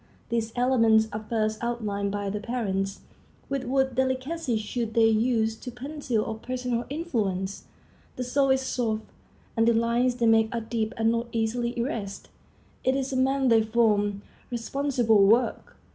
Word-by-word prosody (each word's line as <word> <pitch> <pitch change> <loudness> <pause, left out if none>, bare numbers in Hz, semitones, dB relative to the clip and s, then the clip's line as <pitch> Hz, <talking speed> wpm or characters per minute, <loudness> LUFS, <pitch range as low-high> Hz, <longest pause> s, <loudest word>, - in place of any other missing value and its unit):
These 230 -1 -1
elements 230 -3 +4
are 215 +1 -4
first 215 -1 -1
outlined 210 -4 -2
by 205 -1 -2
the 210 - -3
parents. 200 -4 -2 0.5
With 270 -1 -2
what 265 +1 +1
delicacy 260 +1 -1
should 220 +1 -3
they 230 -1 +5
use 225 0 +2
the 250 - -8
pencil 250 -2 -3
of 220 0 -5
personal 250 -2 -2
influence! 210 - -2 0.5
The 250 - -3
soul 275 +2 +1
is 265 0 +3
soft, 225 -4 -1 0.5
and 225 -1 +3
the 235 - +4
lines 235 +2 +2
they 240 -1 0
make 225 -1 +4
are 230 - -1
deep 225 0 -2
and 225 0 +3
not 230 +1 -1
easily 235 +2 -1
erased. 225 -5 -4 0.5
It 260 +1 +2
is 270 0 -2
a - - -1
man 265 0 +2
they 225 -1 +5
form. 210 -3 +1 0.3
Responsible 240 -3 +2
work! 235 +4 +1
235 Hz, 160 wpm, -26 LUFS, 220-255 Hz, 0.5 s, they